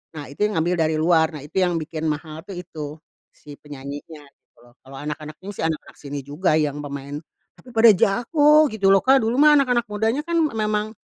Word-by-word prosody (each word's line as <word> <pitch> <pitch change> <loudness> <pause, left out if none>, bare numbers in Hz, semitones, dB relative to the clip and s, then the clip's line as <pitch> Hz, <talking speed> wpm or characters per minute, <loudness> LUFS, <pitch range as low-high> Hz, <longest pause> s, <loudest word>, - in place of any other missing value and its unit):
nah 150 - -6
itu - - -15
yang 210 - -5
ngambil 175 +3 0
dari 160 - -1
luar, 160 0 +3
nah 145 - -8
itu 150 +6 -3
yang 180 -2 +1
bikin 160 0 -4
mahal 155 +1 -4
tuh 195 - -7
itu 155 -4 -7 0.4
si 145 -1 -13
penyanyinya 145 +2 -9
gitu - - -57
loh. 120 - -20
Kalau 135 +1 -14
anak-anak 150 0 -6
ini 200 - -6
sih 200 - -6
anak-anak 160 -2 -6
sini 140 -1 -6
juga 155 +3 0
yang 150 -2 0
pemain 140 0 -6 0.4
tapi 255 - -16
pada 225 0 +8
jago 290 - +3
gitu 200 -3 0
loh 195 - +3
Kak, 270 +1 +5
dulu 225 +2 0
mah 295 +2 +6
anak-anak 245 -3 +1
mudanya 225 +7 0
kan 340 +1 -2 0.2
memang 215 0 -1
165 Hz, 205 wpm, -22 LUFS, 150-220 Hz, 0.4 s, pada